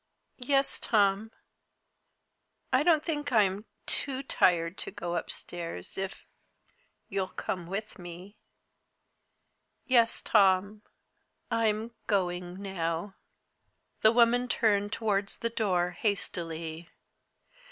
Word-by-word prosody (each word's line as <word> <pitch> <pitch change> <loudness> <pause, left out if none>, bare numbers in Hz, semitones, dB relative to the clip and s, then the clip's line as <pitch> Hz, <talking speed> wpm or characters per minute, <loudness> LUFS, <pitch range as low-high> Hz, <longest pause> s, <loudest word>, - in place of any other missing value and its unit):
Yes, 275 +2 +2
Tom 205 0 +2 1.4
I 255 - +5
don't 310 -1 +4
think 295 -4 -2
I'm 205 -2 +2 0.2
too 270 -1 -2
tired 170 -8 +2
to - - -4
go 175 0 -4
upstairs, 170 - -4
if 195 0 -5 0.8
you'll 190 -1 -1
come 180 -2 -4
with 205 +3 -5
me. 175 +3 -10 1.5
Yes, 235 -3 +3
Tom 200 0 +3 0.7
I'm 225 0 +1 0.2
going 180 -3 -1
now." 175 0 -2 0.9
The 220 - +7
woman 240 +1 +4
turned 205 -4 +2
towards 205 -3 -1
the 230 0 -2
door 180 -6 +1
hastily. 170 -4 -3
200 Hz, 95 wpm, -29 LUFS, 180-230 Hz, 1.5 s, The